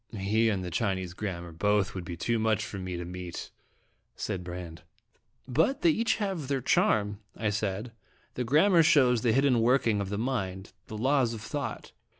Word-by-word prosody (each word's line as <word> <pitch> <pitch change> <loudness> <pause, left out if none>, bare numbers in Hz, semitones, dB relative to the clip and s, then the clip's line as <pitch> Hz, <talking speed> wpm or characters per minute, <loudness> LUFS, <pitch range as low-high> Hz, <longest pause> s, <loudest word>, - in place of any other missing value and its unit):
" - - -51 0.2
He 110 +1 +4
and 100 -3 -1
the 90 - -5
Chinese 95 -1 -1
grammar 90 -4 -5
both 105 +4 +1
would 90 -2 -6
be 85 0 -6
too 115 +6 0
much 110 0 +1
for 100 -3 -6
me 90 -1 -4
to 85 - -5
meet/' 90 -1 -7 0.6
said 95 -4 -4
Brande. 85 -2 -7 0.4
" - - -46
But 160 - +1
they 340 - +6
have - - -2 0.4
each 140 - -6
their 140 -1 0
charm," 105 -4 +2 0.2
I 110 -2 0
said. 105 +2 -2 0.4
"The 125 - -2
grammar 165 - +5
shows 130 -8 +4
the 115 - +2
hidden 130 -1 +3
working 115 -3 +3
of 100 - -4
the 100 - -2
mind, 100 -5 -3
the 110 - -6
laws 130 0 +2
of 110 - -8
thought." - - -5
110 Hz, 190 wpm, -29 LUFS, 95-125 Hz, 0.6 s, they